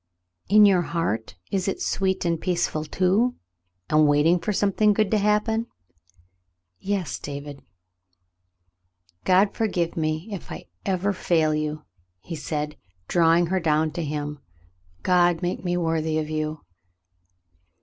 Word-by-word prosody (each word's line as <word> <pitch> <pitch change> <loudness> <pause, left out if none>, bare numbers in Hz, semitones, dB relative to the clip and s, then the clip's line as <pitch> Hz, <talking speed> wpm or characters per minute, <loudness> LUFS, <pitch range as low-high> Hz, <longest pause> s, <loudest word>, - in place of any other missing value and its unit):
"In 210 +1 +7
your 190 -3 +5
heart 165 - -2 0.2
it 190 -1 -1
is 195 - -2
sweet 190 -1 0
and 170 -1 0
peaceful, 175 -4 -1
too, 190 +10 +1 0.5
and 155 0 +4
waiting 150 +4 +4
for 210 - -2
something 205 +1 +2
good 215 -1 +1
to 215 - +3
happen 210 +3 +1 0.6
?" 90 0 -46
"Yes, 195 -4 -2
David." 145 0 -7 1.6
"God 190 +2 +4
forgive 180 -7 -1
me 155 +3 -2
if 195 - -7 0.4
ever 190 +1 0
I - - -3
fail 160 -4 +1
you," 150 0 -3 0.4
he 165 - -7
said, 150 0 -4 0.3
drawing 170 0 +4
her 190 - +2
down 155 -1 +1
to 170 - -4
him. 150 -1 -4 0.6
"God 175 -1 +3
make 175 +1 -2
me 175 -1 0
worthy 160 -2 0
of 155 0 -2
you." 155 0 -3
170 Hz, 135 wpm, -24 LUFS, 155-190 Hz, 1.6 s, In